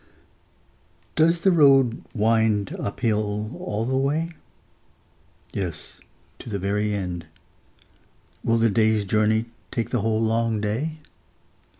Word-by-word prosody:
Does 165 +2 +3
the 190 - +4
road 135 -7 +5
wind 110 -2 +2
up 100 - -5
hill 105 -2 -1
all 105 +2 -2
the 130 +2 -1
way? 150 +5 0 1.2
Yes, 85 -6 -5 0.4
to - - -9
the 100 - -2
very 105 +2 -1
end. 90 -5 -4 1.2
Will 115 0 +2
the 115 -1 +3
day's 110 -1 +2
journey 110 +2 +2 0.2
take 115 -3 -3
the 125 - +1
whole 110 +1 +1
long 115 0 +1
day? 120 +10 -2
110 Hz, 115 wpm, -24 LUFS, 105-125 Hz, 1.2 s, road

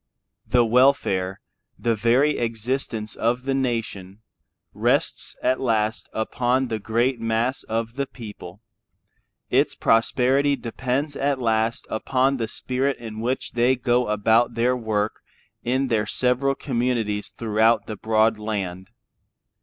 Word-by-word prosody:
The 120 -1 +4
welfare, 110 -7 +2 0.4
the 115 - +1
very 125 +7 +2
existence 115 -1 -2
of 120 +2 0
the 135 0 -1
nation, 115 -6 -3 0.5
rests - - 0
at 130 - +2
last 110 -3 0
upon 125 +3 0
the 110 -1 -2
great 120 +4 0
mass 115 +3 0
of 115 +1 -2
the 140 +1 -2
people; 105 -4 -10 0.9
its - - +2
prosperity 130 +5 +2
depends 135 +4 -3
at 140 -1 0
last 115 -1 0
upon 130 +4 +1
the 115 -2 -2
spirit 130 +3 -2
in 110 -2 -8
which 125 +4 -2
they 120 +2 +3
go 125 0 +1
about 110 +3 +2
their 120 +2 +2
work 110 -3 -2 0.4
in 130 +3 0
their 110 -3 0
several 130 +2 +1
communities 120 -6 -1
throughout 110 0 +2
the 110 - -5
broad 110 +1 +2
land. 95 -4 -4
115 Hz, 125 wpm, -23 LUFS, 110-130 Hz, 0.9 s, The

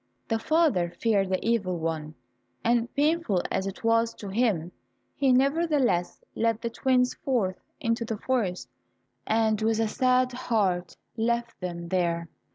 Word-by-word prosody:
The 225 -1 +1
father 295 - +2
feared 200 -4 +2
the 190 - +2
Evil 200 -6 +1
One, 160 -1 -3 0.5
and 235 0 +2
painful 290 - +1
as 190 - -1
it 195 - -7
was 230 0 +2
to 205 - -8
him, 195 -6 0 0.4
he 270 -2 +3
nevertheless 275 - +2
led 225 -1 +1
the 230 0 -4
twins 250 +1 +2
forth 215 -9 -1 0.2
into 230 0 0
the 225 -1 -3
forest, 205 - -1 0.6
and 220 -1 +2
with 220 0 +1
a 225 - +2
sad 255 +2 +2
heart 200 -8 -1 0.2
left 235 +1 -1
them 170 -2 -5
there. 170 -2 0
225 Hz, 145 wpm, -27 LUFS, 185-250 Hz, 0.6 s, he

